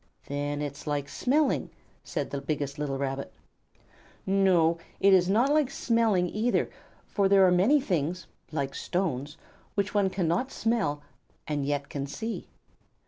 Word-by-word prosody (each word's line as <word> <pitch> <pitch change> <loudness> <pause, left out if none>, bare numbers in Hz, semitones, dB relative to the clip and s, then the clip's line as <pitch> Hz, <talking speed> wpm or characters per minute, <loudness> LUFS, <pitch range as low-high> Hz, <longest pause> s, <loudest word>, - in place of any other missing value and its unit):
"Then 145 +1 -2
it 145 - -2
is 150 - -12
like 145 -1 -1
smelling," 275 - +1 0.3
said - - -3
the 140 - -3
biggest 145 0 -3
little 140 -2 -2
Rabbit. 135 0 -3 0.9
"No, 185 -4 +3 0.2
it 195 0 +5
is 180 -1 +5
not 240 +8 +3
like 300 -4 +3
smelling, 230 -9 +2
either, 220 +7 0 0.3
for 200 -2 +1
there 195 -1 +6
are 180 - +5
many 200 +12 +5
things, 180 - -1 0.3
like 140 -3 -2
stones, 150 -6 -2 0.4
which 200 -1 0
one 200 -2 +3
cannot 185 +7 0
smell 180 -11 0 0.4
and 145 -2 -1
yet 145 -1 -1
can 140 -1 -4
see." 220 +11 -5
180 Hz, 145 wpm, -28 LUFS, 145-205 Hz, 0.9 s, there